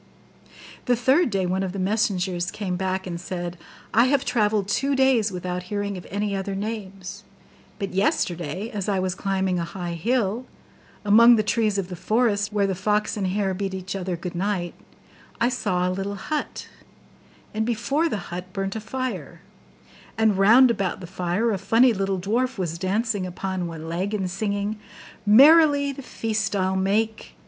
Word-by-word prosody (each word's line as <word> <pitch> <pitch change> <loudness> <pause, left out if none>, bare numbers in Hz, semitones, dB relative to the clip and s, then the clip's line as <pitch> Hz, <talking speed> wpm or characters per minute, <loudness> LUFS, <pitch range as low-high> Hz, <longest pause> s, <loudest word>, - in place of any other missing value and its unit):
The 245 - +3
third 265 +7 +3
day 195 -3 0
one 185 +2 0
of 190 -2 -3
the - - -5
messengers 185 -3 0
came 190 -4 -3
back, 190 +1 -2
and 170 -2 -5
said, 175 -1 -5 0.4
'I 230 +3 +5
have 275 +1 +2
travelled 210 -3 +1
two 275 +6 0
days 260 -6 +3
without 180 0 -4
hearing 205 -1 -2
of 180 - -9
any 200 0 -2
other 195 0 -3
names; 195 -3 -6 0.5
but 195 -2 -4
yesterday, 185 - -1
as 205 -2 -3
I 200 - +1
was 185 -1 0
climbing 190 -2 -1
a - - -1
high 175 0 -5
hill, 225 +5 -1 0.6
among 230 +4 +7
the 215 - +1
trees 215 -1 +1
of 195 -2 -2
the 180 - -5
forest 210 +2 +1
where 205 -1 +1
the 195 - 0
fox 210 +3 0
and 200 -3 -1
the - - -1
hare 195 0 0
bid 190 0 -3
each 185 0 -5
other 185 -2 -2
good 175 +1 -6
night, 180 -1 -2 0.7
I 235 - +3
saw 180 -8 0
a - - 0
little 195 +2 -3
hut; 295 +10 -4 0.9
and 220 +1 0
before 240 +8 0
the 185 - -5
hut 180 +1 -6
burnt 195 0 -3
a 220 - -4
fire; 255 +4 -5 0.8
and 220 -2 +3
round 230 +6 +6
about 195 -5 -2
the 185 - -8
fire 180 +5 -1
a 200 - -1
funny 235 +6 +4
little 195 -1 -1
dwarf 235 +8 -1
was 170 -3 -3
dancing 200 +1 -1
upon 185 0 -3
one 160 -1 -7
leg, 185 +6 -2
and 190 -3 -2
singing: 205 +2 -2 0.5
"Merrily 285 +4 +7
the 275 - -8
feast 215 -5 -2
I'll 190 -1 +1
make. 215 +4 -1
200 Hz, 175 wpm, -24 LUFS, 185-220 Hz, 0.9 s, among